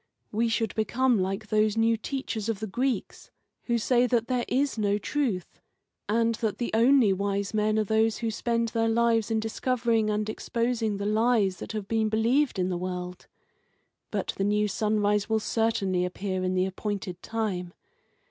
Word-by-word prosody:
We 230 +2 +1
should 225 -2 0
become 235 +2 +1
like 195 +3 -2
those 215 0 +2
new 225 0 +3
teachers 230 -2 -4
of 220 -3 -1
the 220 - -3
Greeks, 250 +5 -2 0.4
who 235 -1 +1
say 245 +2 +2
that 235 0 0
there 250 -2 0
is 275 +2 +1
no 205 -2 +1
truth, 215 -4 -2 0.5
and 230 +1 +2
that 220 -3 -1
the 240 - -2
only 235 -2 +5
wise 200 +1 -2
men 215 0 +1
are 215 - +3
those 220 +1 +2
who 230 -1 -2
spend 230 +1 -1
their 225 0 +1
lives 230 -1 +2
in 225 -1 +1
discovering 225 0 0
and 210 0 -1
exposing 230 -1 -1
the 200 - -4
lies 215 -3 +2
that - - -7
have 210 -3 -4
been 220 0 +1
believed 235 +5 +2
in 185 0 0
the 180 - -1
world. 180 0 -5 0.8
But - - -2
the 195 - 0
new 210 +1 +2
sunrise 210 0 +1
will 220 0 +2
certainly 205 -5 0
appear 185 +1 -3
in 185 0 0
the 185 0 +2
appointed 190 -2 -4
time. 200 -6 -3
220 Hz, 175 wpm, -27 LUFS, 200-230 Hz, 0.8 s, only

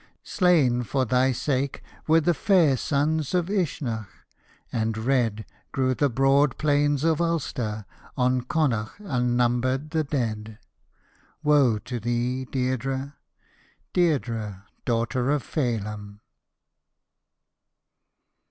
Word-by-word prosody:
Slain 155 -10 +3
for 130 +2 -1
thy 125 +3 +2
sake 135 +2 -2 0.2
were 160 +1 +5
the 175 +3 +2
fair 170 -6 +3
sons 150 +4 0
of 175 0 +1
Uisneach, 135 - -2 0.6
and 110 -1 -1
red 115 -3 0 0.3
Grew 130 -1 +1
the 145 +2 +1
broad 135 +2 +3
plains 145 -1 +2
of 165 0 +2
Ulster, 125 -11 -2 0.3
on 125 0 +2
Connaught 125 - -1
un 125 -6 0
numbered 130 +4 +1
the 160 -1 +1
dead 110 -7 -3 0.4
— 150 - -36
Woe 145 -7 +4
to 120 +4 -5
thee, 120 +3 -1
Deirdre, 130 +2 -2 0.8
Deirdre, 115 - 0 0.2
daughter 120 +2 0
of 145 -3 +1
Feihm 105 -6 -3
130 Hz, 105 wpm, -25 LUFS, 120-145 Hz, 0.8 s, were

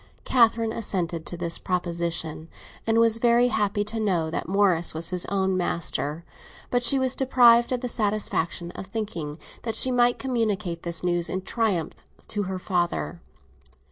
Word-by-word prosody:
Catherine 230 -2 +3
assented 175 -7 -3
to 175 - -5
this 170 -1 -1
proposition, 170 -3 -2 0.4
and 225 0 +2
was 230 0 +4
very 240 +1 +4
happy 205 -2 0
to 220 +2 -3
know 175 -7 0
that - - -3
Morris 185 -5 +2
was 165 +3 0
his 180 -1 +1
own 190 -1 0
master; 170 -3 -2 0.5
but 245 - +2
she 260 +3 +5
was 260 -1 +1
deprived 240 -3 +5
of 250 -1 -1
the 250 - -2
satisfaction 200 -6 -1
of 190 - -8
thinking 190 -8 -5 0.2
that 225 -2 -3
she 255 +3 +4
might 245 -1 +3
communicate 215 -9 -2
this 170 -1 -1
news 175 -1 0
in 185 0 -3
triumph 195 -7 -2 0.2
to 210 - -2
her 190 - -3
father. 175 -2 -2
195 Hz, 160 wpm, -25 LUFS, 170-230 Hz, 0.5 s, she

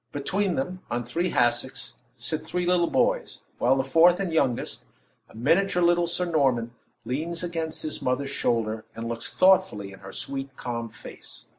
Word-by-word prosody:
Between 185 +6 0
them, 180 +7 -3
on 120 0 -1
three 170 +10 -1
hassocks, 120 -5 0 0.2
sit - - -3
three 180 0 -2
little 175 -1 +3
boys; - - +1 0.2
while 130 +2 +4
the 135 - +1
fourth, 165 +6 +5
and 185 -4 -2
youngest, 135 -7 0 0.5
a - - -17
miniature 180 +8 +2
little 175 0 +4
Sir 175 +1 0
Norman, 135 -8 +1 0.3
leans 165 +7 -2
against 165 -2 -3
his 155 - -3
mother's 135 +1 -1
shoulder, 110 -4 0
and 115 0 -5
looks 115 0 -4
thoughtfully 185 - +3
in 95 - -12
her 95 0 -10
sweet, 135 +4 -5
calm 115 -2 -4
face. - - -11
145 Hz, 165 wpm, -26 LUFS, 120-175 Hz, 0.5 s, fourth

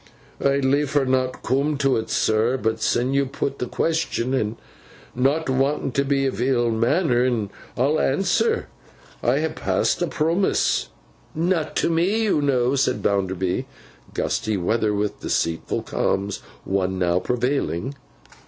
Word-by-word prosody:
'I'd 140 0 +2
leefer 140 +1 +2
not 130 0 0
coom 140 +3 +1
to 135 -1 +2
't, 110 - -11
sir; 110 +4 +2
but 110 -2 -1
sin 125 +3 +1
you 140 0 +2
put 140 +1 -3
th' 125 - -3
question—an' 130 -8 -1 0.6
not 140 +6 +1
want'n 135 +1 0
t' 140 - +1
be 140 0 +1
ill 120 -1 +1
manner'n—I'll 125 - 0
answer. 195 - +1 0.6
I - - +2
ha - - 0
passed - - 0
a - - +1
promess.' 165 +5 +1 0.5
'Not 165 -1 0
to - - +1
me, 185 +7 +2
you 195 -8 +2
know,' 130 -3 +2
said 135 -1 +1
Bounderby. 95 -2 0 0.5
(Gusty 110 -2 -1
weather 110 +4 +1
with 105 0 -2
deceitful 80 -1 -1
calms. 100 +1 -1 0.3
One 95 -1 0
now 90 -1 +2
prevailing.) 125 - -1
130 Hz, 130 wpm, -23 LUFS, 110-145 Hz, 0.6 s, I'd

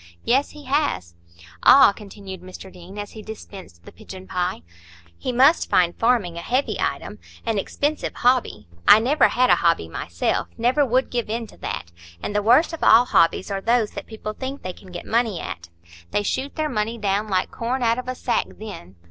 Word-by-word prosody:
"Yes, 270 +4 +2
he 295 -1 -13
has." 270 - -1 0.5
"Ah!" 270 -6 +8
continued 195 -2 -10
Mr 185 +1 -11
Deane, 180 +2 -12
as 205 0 -6
he 220 - -10
dispensed 195 - -11
the - - -11
pigeonpie, 180 - -5 0.5
"he 255 - -4
must 270 +7 +4
find 175 -1 +3
farming 225 -8 +1
a - - -4
heavy 255 +9 0
item,—an 225 -3 -4
expensive 290 +9 -2
hobby. 245 - +1 0.2
I - - +10
never 260 +8 +3
had 250 0 +2
a - - +5
hobby 165 - +1
myself, 85 +1 -2
never 245 +5 +2
would 255 0 +1
give 240 -3 -2
in 230 +1 -2
to - - -16
that. 85 - -5 0.3
And 205 - -4
the 210 - +2
worst 250 +11 +4
of 330 - -6
all 230 +3 +7
hobbies 185 -2 +2
are 195 -1 -2
those 230 0 +1
that - - -8
people 215 -1 -6
think 265 +5 -6
they 185 - -4
can 185 0 -15
get 175 - -7
money 225 -5 0
at. 85 0 -7 0.4
They 205 - 0
shoot 265 +6 -3
their 310 -1 -1
money 225 -3 -2
down 205 0 -1
like 185 -3 0
corn 245 +2 -2
out 230 +1 +2
of 255 - -7
a 255 - -3
sack 240 -1 -1
then." 195 - -9
220 Hz, 190 wpm, -22 LUFS, 185-250 Hz, 0.5 s, I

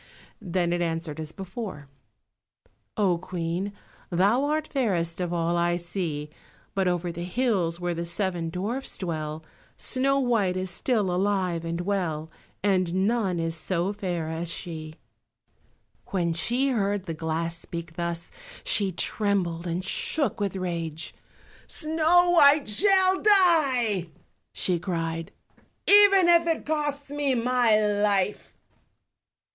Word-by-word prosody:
then 175 -3 0
it 175 - -1
answered 165 -2 -3
as 155 -1 -5
before— 190 - -7 1.1
"Oh, 185 -5 +2
Queen, 175 +2 -3 0.4
thou 200 +10 +3
art 305 +1 0
fairest 180 - -1
of 175 -1 -2
all 170 0 0
I 175 0 +1
see, 170 -4 -4 0.4
But 190 -1 +1
over 175 -1 0
the 170 +1 -6
hills, 180 -4 0
where 175 0 -1
the 170 0 -3
seven 170 -1 -2
dwarfs 210 +10 -3
dwell, 155 -3 -4 0.3
Snow 275 +1 +1
white 220 -8 +1
is 185 -1 -2
still 205 -2 0
alive 185 -3 0
and 170 +1 -3
well, 170 -5 -2 0.3
And 185 -2 +2
none 210 -7 0
is 165 0 -2
so 180 +3 -1
fair 180 -5 -3
as 160 +1 -3
she." 160 -2 -6 1.1
When 170 -3 0
she 240 +11 +1
heard 205 -5 0
the 165 - -4
glass 165 +1 -1
speak 170 0 -6
thus 170 -1 -3 0.3
she 200 -2 +2
trembled 180 -3 0
and 175 +2 -2
shook 275 +6 0
with 200 -2 -1
rage. 165 -4 -3 0.5
"Snow 330 +3 +3
white 290 -3 +6
shall 380 - +3
die," 280 - +4 0.4
she 180 -2 0
cried, 165 -2 -3 0.6
"even 395 -3 +7
if 340 -1 +5
it 325 -1 0
costs 290 -2 -2
me 285 -2 0
my 240 -2 +3
life!" 205 -2 +1
185 Hz, 130 wpm, -26 LUFS, 170-240 Hz, 1.1 s, even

